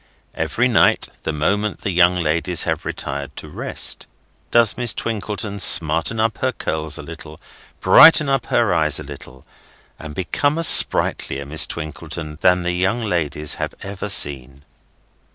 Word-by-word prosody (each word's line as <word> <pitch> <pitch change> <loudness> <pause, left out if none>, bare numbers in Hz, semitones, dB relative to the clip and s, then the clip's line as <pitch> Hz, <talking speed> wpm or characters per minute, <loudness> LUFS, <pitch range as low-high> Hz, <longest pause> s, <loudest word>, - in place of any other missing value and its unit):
Every 125 +2 -1
night, 120 -5 +2
the - - -3
moment 100 +7 -2
the 100 - -3
young 90 0 +3
ladies 85 +1 -1
have - - -3
retired 70 -1 -6
to - - -9
rest, - - -2 0.4
does 115 -3 +3
Miss 120 -3 -1
Twinkleton 105 -2 -4
smarten 80 +5 +3
up 110 0 -1
her 130 - 0
curls 80 - -3
a - - -9
little, - - -11 0.4
brighten 155 -2 +7
up 135 -3 -1
her 115 -6 +1
eyes 75 -3 +1
a - - -7
little, 70 -3 -12 0.5
and 80 -2 -9
become 145 - -1
a 165 - -2
sprightlier 70 - +2
Miss 75 +3 0
Twinkleton 80 -1 -7
than 90 0 +3
the 90 - -1
young 95 +6 -1
ladies 75 -7 -2
have - - -4
ever 100 +1 -6
seen. 70 -6 +1
90 Hz, 150 wpm, -19 LUFS, 75-105 Hz, 0.5 s, brighten